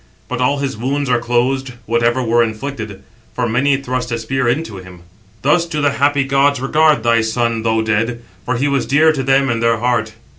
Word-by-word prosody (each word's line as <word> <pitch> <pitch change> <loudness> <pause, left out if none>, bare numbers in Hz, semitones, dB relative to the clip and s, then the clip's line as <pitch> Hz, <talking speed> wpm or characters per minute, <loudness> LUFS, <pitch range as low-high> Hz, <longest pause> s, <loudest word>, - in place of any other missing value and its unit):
But 125 0 -4
all 135 +3 +2
his 140 -1 -3
wounds 135 +4 -2
are 125 - +3
closed, 125 +2 -1
whatever 115 +2 +1
were 120 0 +2
inflicted; 110 -3 -4 0.3
for 125 -1 0
many 135 +5 +2
thrust 125 -2 -4
a 115 - 0
spear 130 +3 -2
into 120 -4 -1
him. 90 -1 -12 0.4
Thus 165 +5 +2
do 155 -3 -3
the 145 -1 +2
happy 140 0 +1
gods 140 0 +2
regard 150 -1 +2
thy 115 -1 +3
son, 115 0 -1
though 110 0 +1
dead; 115 +2 -1 0.2
for 125 +5 -2
he 135 +5 0
was 140 -2 0
dear 155 +3 +4
to 145 -4 -2
them 135 +1 +2
in 115 - -1
their 115 0 +2
heart." 115 -2 -1
125 Hz, 200 wpm, -17 LUFS, 115-140 Hz, 0.4 s, dear